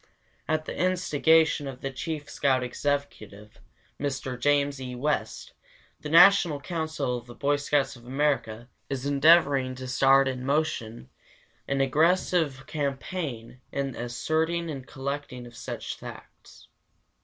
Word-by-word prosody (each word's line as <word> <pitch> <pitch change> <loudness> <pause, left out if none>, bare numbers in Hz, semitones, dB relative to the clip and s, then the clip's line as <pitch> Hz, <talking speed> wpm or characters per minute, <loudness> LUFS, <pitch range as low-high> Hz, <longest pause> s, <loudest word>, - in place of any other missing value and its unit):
At 155 0 0
the - - -5
instigation 160 -4 +2
of 130 -1 -8
the 135 - -3
chief 150 +2 -5
scout 130 -3 +1
executive, 120 -6 -4 0.4
Mr. 135 -2 -3
James 140 0 +1
E. 125 -1 -6
West, 125 -4 -2 0.5
the 150 - -7
National 170 -2 +6
Council 155 -5 -3
of 120 - -18
the 120 - -11
Boy 145 +1 +1
Scouts 145 -1 0
of 120 0 -15
America 130 -5 -1 0.2
is 135 -1 -3
endeavoring 140 -2 +4
to 130 0 -7
start 135 +1 +4
in 130 -1 -3
motion 130 - -2 0.6
an 135 0 0
aggressive 155 -1 +1
campaign 140 -4 -4
in 140 -1 -2
the - - -10
ascertaining 160 +7 -1
and 135 -3 -7
collecting 140 -2 -5
of 120 -1 -13
such - - -6
facts. - - -13
140 Hz, 130 wpm, -27 LUFS, 130-155 Hz, 0.6 s, National